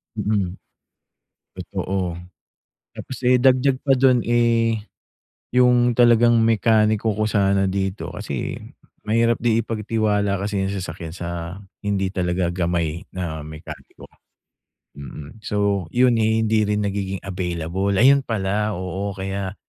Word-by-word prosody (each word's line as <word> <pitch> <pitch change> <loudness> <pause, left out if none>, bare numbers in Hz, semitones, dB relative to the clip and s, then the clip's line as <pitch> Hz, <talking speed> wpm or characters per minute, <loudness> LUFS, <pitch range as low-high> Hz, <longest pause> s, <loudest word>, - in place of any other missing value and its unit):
Mm, 100 -4 -1 1.0
totoo. 95 -2 -3 0.8
Tapos, 130 - -7
eh, 125 +1 +5
dagdag 130 +1 +3
pa 140 - +4
dun, 130 -2 +3
eh, 115 -1 +2 0.8
yung 125 -1 +4
talagang 120 -1 +5
mekaniko 110 -1 +3
ko 110 - 0
sana 100 -2 +2
dito 95 +1 -3
kasi - - -4 0.5
mahirap 115 +2 +2
din 115 -2 +2
ipagtiwala 105 -2 0
kasi 100 +1 -2
yung 95 - -1
sasakyan 90 -4 -5
sa 85 +1 -5 0.2
hindi 100 -2 -1
talaga 90 -2 -1
gamay 85 -1 -1
na 85 -4 -4
mekaniko. 80 +1 -11 1.0
Mm. 75 +6 -10
So, 100 -3 -1
yun, 125 -1 +3
eh, 110 0 +2
hindi 110 -1 +2
rin 105 0 0
nagiging 95 -2 -3
available. 90 +1 -2
Ayun 135 +7 +6
pala, 105 -2 -1
oo, 95 +2 -4
kaya 95 0 -4
100 Hz, 120 wpm, -22 LUFS, 95-115 Hz, 1.0 s, Ayun